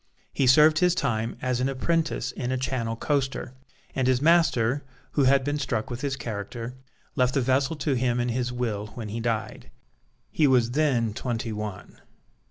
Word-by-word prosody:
He 135 - +1
served 155 +4 +6
his 180 -1 +3
time 115 -7 -1
as 125 -1 0
an 130 +2 +1
apprentice 155 -2 -1
in 125 0 -4
a 130 - 0
Channel 125 -3 -2
coaster, 135 0 -1 0.4
and 130 -1 0
his 130 -1 +3
master, 145 -5 +3 0.3
who 140 - +2
had 135 +1 +4
been 145 +2 -1
struck 125 -4 -2
with 120 +1 -5
his 140 -2 -1
character, 115 0 -5 0.4
left 125 +1 +2
the 135 - +3
vessel 130 +4 +1
to 150 -1 -1
him 125 -1 +1
in 120 0 0
his 125 +1 -1
will 115 -4 -2
when 110 -3 -6
he 110 +3 -4
died. 115 -2 -3 0.6
He 150 - +3
was 125 -3 +3
then 125 -6 +1
twenty 115 -1 -3
one. 105 -2 -7
125 Hz, 180 wpm, -26 LUFS, 115-140 Hz, 0.6 s, served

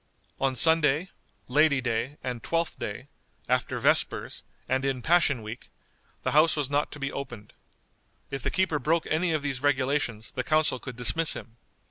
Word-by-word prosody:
On 135 -1 +1
Sunday, 160 +3 +4 0.4
Lady 145 +1 +4
day, 130 +3 -2
and 125 -2 -4
Twelfth 165 +7 -1
day, 115 +6 -5 0.4
after - - 0
vespers, - - +2 0.3
and 130 +1 0
in 135 -3 -1
Passion 160 -8 +3
Week, 110 +3 -8 0.5
the - - 0
house 155 +2 +5
was 145 -3 -2
not 145 +1 0
to 150 - -9
be 140 0 -2
opened. 120 -6 -7 0.8
If 135 -1 -4
the - - -1
keeper 185 -6 +1
broke 160 +5 +1
any 165 +2 +1
of 155 -2 -1
these 135 -3 -2
regulations 130 -5 0
the 125 - -3
council 155 -3 +1
could 130 -1 -8
dismiss 125 +7 0
him. 115 0 -10
140 Hz, 165 wpm, -27 LUFS, 125-155 Hz, 0.8 s, house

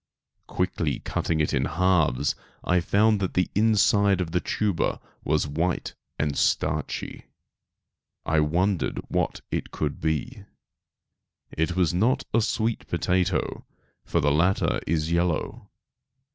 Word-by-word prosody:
Quickly - - -1
cutting 80 -2 -1
it 75 - +1
in 65 -1 +1
halves 80 -6 +2 0.3
I 90 0 +2
found 105 +4 +3
that 95 -2 -2
the 90 - +1
inside 100 -2 +3
of 85 -3 -2
the 90 - +1
tuber 100 -6 -1 0.2
was 75 0 +1
white 80 +5 -2 0.2
and 75 -2 -1
starchy. - - -1 1.0
I 80 0 +2
wondered 90 +5 +1
what - - -1
it - - -2
could - - -3
be. 80 -1 -2 1.1
It 80 +2 0
was 90 -4 +2
not 110 +9 +2
a 115 - +4
sweet 110 +1 -1
potato, 90 -1 0 0.4
for - - 0
the 75 - +2
latter 85 +6 +2
is 80 0 0
yellow. 85 -1 -1
90 Hz, 125 wpm, -25 LUFS, 80-100 Hz, 1.1 s, a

